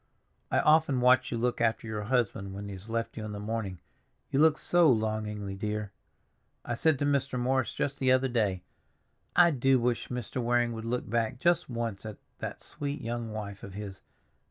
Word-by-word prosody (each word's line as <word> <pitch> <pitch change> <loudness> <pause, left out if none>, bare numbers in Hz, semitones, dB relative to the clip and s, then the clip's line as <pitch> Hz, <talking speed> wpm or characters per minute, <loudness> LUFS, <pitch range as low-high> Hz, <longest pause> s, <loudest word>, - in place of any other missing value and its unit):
I - - +1
often 150 -4 +4
watch 125 +1 +4
you 120 - -1
look 120 +1 0
after 115 0 +1
your 105 -2 -4
husband 110 -5 0
when 100 +1 -6
he 100 - -6
has 95 +3 -9
left 115 0 -2
you 110 - -4
in 105 -1 -5
the 100 - -5
morning; 105 -3 -3 0.5
you 135 - +2
look 155 0 +5
so 175 -3 +4
longingly, 110 -3 -1
dear. 105 +1 -3 0.7
I 120 - -2
said 155 +4 +2
to 145 - -1
Mr. 140 -3 0
Morris 130 0 +1
just 140 0 -2
the 130 -1 +3
other 130 +1 +4
day, 105 -7 0 0.7
'I 170 -1 +7
do 135 -1 +3
wish 120 0 0
Mr. 125 0 -4
Waring 120 0 +2
would 115 0 -6
look 125 +2 -2
back 115 +2 0
just 175 +1 +2
once 115 -4 -3
at 110 -1 -7 0.2
that - - -6
sweet 145 0 -4
young 115 -1 -4
wife 100 -2 -6
of 95 -1 -9
his. 100 -2 -7
115 Hz, 195 wpm, -29 LUFS, 105-130 Hz, 0.7 s, I